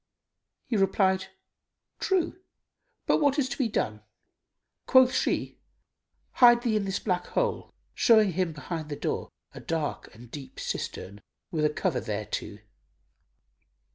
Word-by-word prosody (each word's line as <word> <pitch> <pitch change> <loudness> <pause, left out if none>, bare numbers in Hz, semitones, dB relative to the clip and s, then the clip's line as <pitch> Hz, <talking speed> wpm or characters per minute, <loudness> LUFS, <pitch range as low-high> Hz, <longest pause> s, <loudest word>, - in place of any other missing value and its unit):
He 235 - -1
replied, 190 -1 +2 0.7
"True, 365 -1 0 0.6
but - - +3
what 285 -1 +3
is 280 -3 +2
to - - -4
be 260 - +2
done?" 110 - -2 0.9
Quoth 260 -1 +6
she, - - -1 0.7
"Hide 240 -1 +6
thee 230 -3 +1
in 210 -2 0
this 195 0 -1
black 180 -4 -2
hole," - - -1 0.2
showing 220 -4 +5
him 180 0 -1
behind 155 0 -6
the 145 - -3
door - - -3 0.2
a - - -9
dark 160 -2 -3
and 120 +1 -14
deep 135 -3 -9
cistern, 100 +2 -5 0.3
with 155 -2 +1
a - - +4
cover 150 -2 -1
thereto. 105 -1 -4
190 Hz, 135 wpm, -27 LUFS, 150-240 Hz, 0.9 s, Quoth